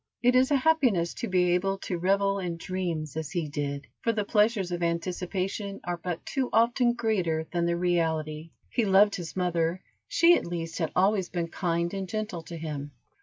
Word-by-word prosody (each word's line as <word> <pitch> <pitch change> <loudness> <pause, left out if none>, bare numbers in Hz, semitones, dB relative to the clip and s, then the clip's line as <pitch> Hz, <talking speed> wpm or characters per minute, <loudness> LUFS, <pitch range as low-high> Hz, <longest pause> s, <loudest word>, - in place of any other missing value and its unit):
It 245 +1 +4
is 255 +1 +5
a 290 - +3
happiness 255 - +2
to - - -4
be 180 -2 +2
able 195 +2 +1
to 180 -3 -3
revel 195 +2 +2
in 175 -3 -3
dreams 165 -4 -3
as 160 -2 -3
he 170 -2 -2
did, 145 -1 -3 0.2
for 230 - +2
the 215 -2 -1
pleasures 210 -3 +2
of 175 0 -3
anticipation 185 +4 -2
are 175 0 -3
but 175 0 -5
too 265 -2 -1
often 240 +1 +3
greater 180 -9 0
than 170 -1 0
the 170 0 +1
reality. 160 -3 0 0.2
He 240 - +1
loved 200 +1 +5
his 170 -3 -5
mother, 175 -1 0 0.2
she 340 +1 +5
at - - -2
least 165 -1 -4
had 160 -3 -1
always 190 0 +2
been 170 -2 -2
kind 170 0 -1
and 195 -2 -4
gentle 215 -5 -3
to 170 - -7
him. 145 -3 -5
180 Hz, 190 wpm, -28 LUFS, 165-200 Hz, 0.2 s, is